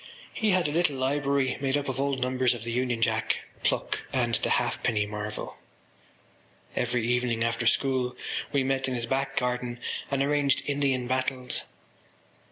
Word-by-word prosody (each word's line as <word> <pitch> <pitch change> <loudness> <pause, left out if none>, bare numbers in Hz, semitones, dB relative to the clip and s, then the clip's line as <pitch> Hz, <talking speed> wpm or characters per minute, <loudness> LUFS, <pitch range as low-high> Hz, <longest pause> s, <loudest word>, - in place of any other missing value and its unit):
He 220 - +1
had 185 -4 +3
a - - -1
little 160 -2 +2
library 140 0 +1
made 135 0 +2
up 145 - -3
of 130 0 -1
old 140 -1 0
numbers 125 -1 +2
of 115 - -7
The 115 - -3
Union 120 -1 0
Jack, 110 -1 +1 0.2
Pluck - - 0
and - - +1
The - - +1
Halfpenny 105 -3 +1
Marvel. 105 0 -5 1.2
Every 120 -1 0
evening 120 -2 +1
after 115 0 0
school 130 -1 +2 0.4
we 140 -2 +2
met 135 0 0
in 130 - -1
his 120 -1 -1
back 135 +2 -1
garden 125 -1 -1 0.3
and 140 -1 +1
arranged 145 -1 +2
Indian 140 -3 +1
battles. 130 0 -1
130 Hz, 160 wpm, -28 LUFS, 120-140 Hz, 1.2 s, had